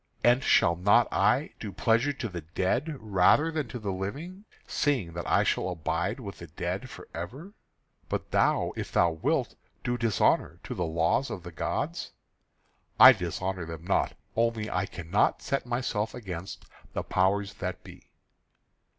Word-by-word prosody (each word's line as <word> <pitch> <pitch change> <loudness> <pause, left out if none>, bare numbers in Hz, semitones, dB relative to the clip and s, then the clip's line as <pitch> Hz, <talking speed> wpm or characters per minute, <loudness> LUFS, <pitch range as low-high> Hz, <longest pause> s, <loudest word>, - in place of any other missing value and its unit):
And 120 +2 +4
shall 85 -1 +4
not 95 +4 +4
I - - +2
do - - -5
pleasure 115 +5 +2
to 130 -4 -4
the 90 -5 -6
dead 95 - -1
rather 110 - +3
than 155 -4 -2
to 125 - -6
the 105 -4 -3
living, 150 - -5 0.2
seeing 125 - 0
that 85 0 -4
I - - +4
shall - - 0
abide 85 - -2
with 100 -6 -8
the 85 - -9
dead 75 - -4
for - - -11
ever? 130 - -7 0.6
But - - -3
thou, - - +2
if - - -5
thou 85 -1 +4
wilt, 80 0 0 0.3
do 120 0 -1
dishonour 115 -4 +2
to - - -5
the 90 -2 -2
laws 85 +11 +1
of 90 - -6
the 90 - -8
gods?" 85 - -3 0.9
"I - - +12
dishonour 95 -2 -3
them 80 -1 -7
not. 100 - +1 0.2
Only 115 -2 0
I 95 +1 0
cannot 85 +4 0
set 135 -2 -2
myself 120 -3 -1
against 95 -6 -7 0.3
the - - -2
powers 100 +2 +1
that 90 -1 -5
be." - - -14
100 Hz, 160 wpm, -28 LUFS, 85-125 Hz, 0.9 s, I